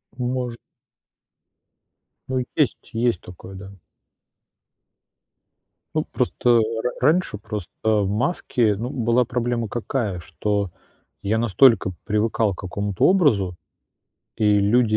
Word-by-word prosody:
Ну, 125 0 -2
может. 125 -2 -2 1.7
Ну, 130 -1 0
есть 150 -5 0
есть 115 -4 0
такое, 90 +2 -11
да. 95 +1 -9 2.2
Ну, - - +1
просто, - - 0
э, 120 -1 +6 0.2
р 125 - -1
раньше 155 - +2
просто, 105 -5 -6
э, 110 - +2
в 105 -3 +2
маске, 115 - +1
ну, 115 +5 -4
была 120 -1 +2
проблема 120 -1 -1
какая? 110 -4 -2
Что 95 +4 -2 0.5
я 105 +3 0
настолько 115 -2 +4
привыкал 105 0 +1
к - - -12
какому-то 100 +1 -1
образу, 115 - +3 0.8
и 105 -1 +3
люди 110 +2 +3
110 Hz, 115 wpm, -23 LUFS, 100-125 Hz, 2.2 s, э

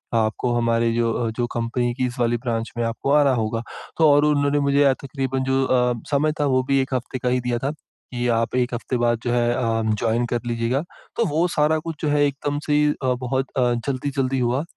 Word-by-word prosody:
आपको 110 +2 0
हमारे 115 0 +1
जो 115 0 0
जो 120 -1 0
कंपनी 120 +1 -1
की 130 0 0
इस 120 0 -8
वाली 120 0 +2
ब्रांच 115 -2 -3
में 120 - 0
आपको 115 +4 -2
आ 150 +1 +6
रहा 140 -2 +3
होगा। 115 0 -1 0.4
तो 160 -2 +5
और 145 +1 +5
उन्होंने 145 -1 +2
मुझे 140 -1 +3
तकरीबन 135 -1 -2
जो 135 0 +1
अ, 125 -1 +2 0.2
समय 150 +2 +2
था 145 - +2
वो 130 -2 +2
भी 135 0 +3
एक 130 0 -4
हफ्ते 130 +1 -4
का 125 - -1
ही 125 0 +1
दिया 120 -1 -1
था, 140 - 0
कि 125 -4 -7
आप 115 +1 -2
एक 125 0 0
हफ्ते 120 +1 -3
बाद 120 -1 +1
जो 120 - -1
है 120 0 +2
अ, 115 -3 0
जॉइन 115 +2 0
कर 120 - 0
लीजिएगा। 120 +4 -1 0.3
तो 230 - +2
वो 160 +3 +1
सारा 155 +1 +3
कुछ 160 0 -6
जो - - +1
है 145 0 +3
एकदम 145 +1 -3
से 150 0 +3 0.2
अ, 130 -1 +2
बहुत 130 +1 -1
अ, 125 -1 +3
जल्दी-जल्दी 135 -1 -1
हुआ 125 +3 0
125 Hz, 225 wpm, -22 LUFS, 120-140 Hz, 0.4 s, आ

